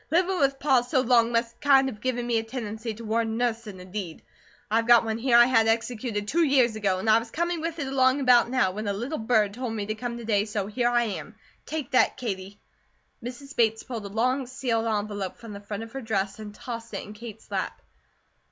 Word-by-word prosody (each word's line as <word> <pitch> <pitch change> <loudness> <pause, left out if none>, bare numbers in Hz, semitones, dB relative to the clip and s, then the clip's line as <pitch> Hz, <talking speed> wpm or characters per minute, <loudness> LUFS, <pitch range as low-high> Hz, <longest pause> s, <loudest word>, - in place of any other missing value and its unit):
Livin' 360 +3 +2
with 275 -1 +2
Pa 270 -3 +3
so 250 +2 0
long 235 -2 +4
must 230 0 -1
kind 270 -2 +5
of 210 -5 -6
given 245 -2 -1
me 235 -1 +1
a - - -4
tendency 225 -1 -5
toward 225 +1 -1
nussin' 225 -3 -2
a 180 - -10
deed. 185 -4 -6 0.5
I've 225 +1 +2
got 240 -1 +7
one 220 0 -2
here 240 0 +4
I 240 - +9
had 225 -3 +3
executed 225 -2 -1
two 335 +9 +2
years 260 -6 +3
ago, 200 -3 0
and 190 - -4
I 220 +1 +6
was 230 0 -8
a - - -25
coming 340 0 -1
with 330 0 -3
it 290 - -2
along 265 0 +3
about 250 -3 +5
now, 245 -7 +2
when 210 +3 -5
'a 200 - 0
little 245 +10 -4
bird 220 -3 +2
tole 250 +2 -4
me' 220 -2 -3
to 215 - -2
come 235 +2 -5
to 235 - -8
day, 205 -2 +2
so 210 -2 -2
here 240 +4 0
I 240 0 +3
am. 205 -2 -5 0.3
Take 300 -3 -4
that, 255 - +3
Katie." 200 -4 -5 0.6
Mrs. 275 +4 -8
Bates 225 -1 +2
pulled 225 -5 -6
a - - -9
long 250 +5 0
sealed 240 -3 -1
envelope 205 -3 -2
from 230 -3 -10
the 200 - -8
front 205 +1 -5
of 225 - -10
her 270 - -6
dress 200 -3 -2
and 215 -1 -7
tossed 230 -2 -7
it - - -4
in 210 - -10
Kate's 220 0 -11
lap. - - -3
230 Hz, 235 wpm, -26 LUFS, 215-255 Hz, 0.6 s, I